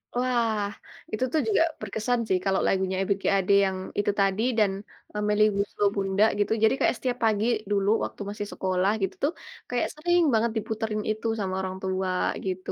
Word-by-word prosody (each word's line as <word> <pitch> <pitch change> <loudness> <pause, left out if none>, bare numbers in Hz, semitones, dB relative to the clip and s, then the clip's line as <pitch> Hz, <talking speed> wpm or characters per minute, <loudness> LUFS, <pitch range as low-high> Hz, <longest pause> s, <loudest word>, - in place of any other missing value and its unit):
Wah, 240 -4 +1 0.5
itu 215 - -1
tuh 315 - +2
juga 420 -6 +3 0.2
berkesan 220 +4 -1
sih 190 - +2
kalau 195 -1 +2
lagunya 190 -1 +1
Ebiet 195 +1 0
G - - -6
Ade 195 +1 +2
yang 190 -1 -1 0.2
itu 205 - +2
tadi 195 +1 +2 0.2
dan, 205 -2 +4 0.4
eee, 210 - -2
Melly 210 0 +3
Goeslaw 200 +1 0
Bunda 195 +1 +2
gitu. 205 - +1
Jadi 220 - +5
kayak - - +2
setiap 250 0 -2
pagi 215 -1 +2 0.3
dulu 200 0 +2
waktu - - -6
masih 205 0 -5
sekolah 185 +1 0
gitu - - -1
tuh 290 - +3 0.4
kayak 245 -1 0
sering 345 +3 +2
banget 225 +1 +2
diputerin 220 0 -2
itu 220 +1 -3
sama 190 -2 -2
orang 185 0 -4
tua 190 0 -1 0.3
gitu. 185 -1 -3
205 Hz, 185 wpm, -26 LUFS, 195-225 Hz, 0.5 s, Jadi